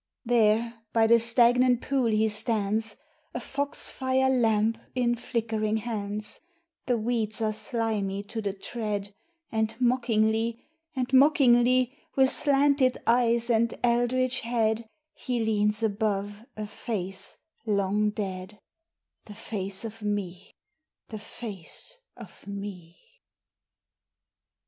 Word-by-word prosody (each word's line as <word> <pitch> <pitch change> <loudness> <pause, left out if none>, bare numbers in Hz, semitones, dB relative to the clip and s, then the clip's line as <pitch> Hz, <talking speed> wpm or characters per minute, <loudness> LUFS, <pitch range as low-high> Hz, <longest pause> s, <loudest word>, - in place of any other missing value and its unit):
IV. - - -9
There 230 0 +3 0.2
by 225 -1 +4
the 235 +1 +6
stagnant 240 +1 +4
pool 270 -3 +1
he 220 0 +2
stands, 215 0 0 0.4
A - - -1
fox 280 +3 -3
fire 265 0 +1
lamp 225 -2 +2 0.2
in 245 -1 +2
flickering 220 -2 -1
hands; 210 -2 -4 0.5
The 245 -2 +2
weeds 220 -1 -1
are 215 -1 0
slimy 215 -3 -2
to 220 +2 -5
the 200 -2 -1
tread, 205 -1 -4 0.4
And 220 +1 -1
mockingly, 230 -2 +1 0.3
and 255 0 -2
mockingly, 255 -2 +5 0.2
With 265 -1 +4
slanted 280 -2 +3
eyes 235 0 +3
and 230 0 +2
eldritch 245 +2 +2
head 225 -1 0 0.3
He 245 -3 -2
leans 210 0 +2
above 205 0 -1
a 215 - -3
face 195 -3 -3 0.3
long 205 0 +1
dead, 195 -1 -5 0.7
The 210 - -11
face 200 -2 -4
of 225 0 -8
me! 200 -3 -3 0.6
the 215 - -6
face 215 - -8 0.2
of - - -13
me! 195 -4 -7
225 Hz, 115 wpm, -27 LUFS, 210-240 Hz, 0.7 s, the